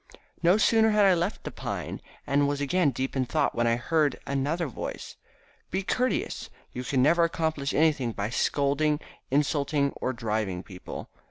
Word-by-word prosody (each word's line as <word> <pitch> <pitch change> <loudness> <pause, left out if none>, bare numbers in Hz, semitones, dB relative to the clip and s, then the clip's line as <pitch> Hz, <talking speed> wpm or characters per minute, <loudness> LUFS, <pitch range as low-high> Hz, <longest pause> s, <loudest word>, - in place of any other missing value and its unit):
No 175 +4 +5
sooner 220 0 +4
had 210 -1 +4
I 190 - +6
left 175 +4 -1
the - - -5
pine, - - -5 0.2
and 140 +1 +2
was 145 0 -1
again 145 +3 +2
deep 130 +1 -3
in 130 -1 +1
thought, - - +1
when 120 0 +1
I 115 - +3
heard 150 +4 +1
another 145 +5 -1
voice. 135 - -6 0.5
"Be 190 +1 -1
courteous, 250 +6 -1 0.2
you 125 - -4
can 130 +1 +1
never 170 +4 +5
accomplish 160 -4 0
anything 150 -6 +2
by 105 0 -3
scolding, 145 +3 +1 0.3
insulting 140 0 +1
or 130 - -3
driving 110 -6 -2
people. 90 -2 -8
145 Hz, 165 wpm, -27 LUFS, 130-165 Hz, 0.5 s, I